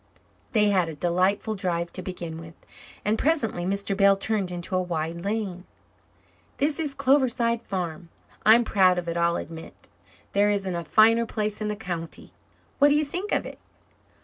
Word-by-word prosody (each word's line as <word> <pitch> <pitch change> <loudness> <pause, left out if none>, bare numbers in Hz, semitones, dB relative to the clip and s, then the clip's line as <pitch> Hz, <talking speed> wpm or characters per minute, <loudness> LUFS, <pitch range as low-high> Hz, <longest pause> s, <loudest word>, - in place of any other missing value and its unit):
They 210 -2 +4
had 185 -4 +2
a 160 - -7
delightful 185 +7 +1
drive 175 -4 -2
to 185 - -4
begin 170 -3 -6
with, 165 0 -11 0.5
and 215 +2 +1
presently 235 - 0
Mr. 200 +1 -2
Bell 200 0 +5
turned 200 -2 -1
into 175 +1 -4
a 185 - +2
wide 170 -1 -3
lane. 200 -3 -3 0.9
"This 290 +2 0
is 295 -4 -3
Cloverside 255 -4 +2
Farm. 175 -5 -5 0.3
I'm 230 +3 +6
proud 185 -5 +3
of 175 -1 -3
it, 170 - -2
I'll 170 0 +2
admit. 165 +1 -9 0.4
There 205 +1 +3
isn't 195 -3 -1
a 170 - -3
finer 225 +5 +4
place 215 -1 -3
in 215 - -1
the 210 - -2
county. 175 -6 -7 0.5
What 285 - +7
do 290 - +4
you 300 0 +2
think 360 +8 -5
of - - +1
it?" - - -9
195 Hz, 175 wpm, -25 LUFS, 175-225 Hz, 0.9 s, What